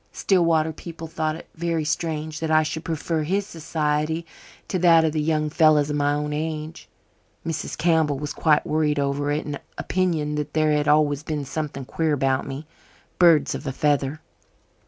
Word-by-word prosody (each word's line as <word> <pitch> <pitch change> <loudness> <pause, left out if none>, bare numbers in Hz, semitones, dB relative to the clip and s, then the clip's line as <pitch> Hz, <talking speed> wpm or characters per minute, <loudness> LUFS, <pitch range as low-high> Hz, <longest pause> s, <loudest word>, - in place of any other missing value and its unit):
Stillwater 165 -4 +2
people 165 +1 -8
thought 155 -1 -2
it 165 - -11
very 165 -1 -1
strange 155 0 -2
that 160 - -2
I 155 0 +4
should 155 +1 -4
prefer 160 0 -2
his 190 +6 0
society 160 -1 -2 0.4
to 185 - -1
that 165 -2 +6
of 160 - +1
the 155 - 0
young 155 -1 0
fellows 155 -2 +4
of - - -1
my 145 0 +2
own 150 0 -2
age. 155 +1 -4 0.6
Mrs. 165 -2 -3
Campbell 160 -4 +2
was 145 +1 -4
quite 155 -2 +2
worried 150 -1 +1
over 140 +1 0
it, 150 +1 -1
and 145 -1 -4 0.2
opined 160 -5 0
that 150 - -4
there 155 -1 +2
had 150 0 +1
always 150 -1 +3
been 150 -2 -3
something 140 -2 -4
queer 160 +3 0
about 135 -1 0
me. 140 +3 -6 0.5
"Birds 170 -5 +5
of 145 - -6
a - - 0
feather." 145 +2 0
155 Hz, 175 wpm, -24 LUFS, 150-160 Hz, 0.6 s, that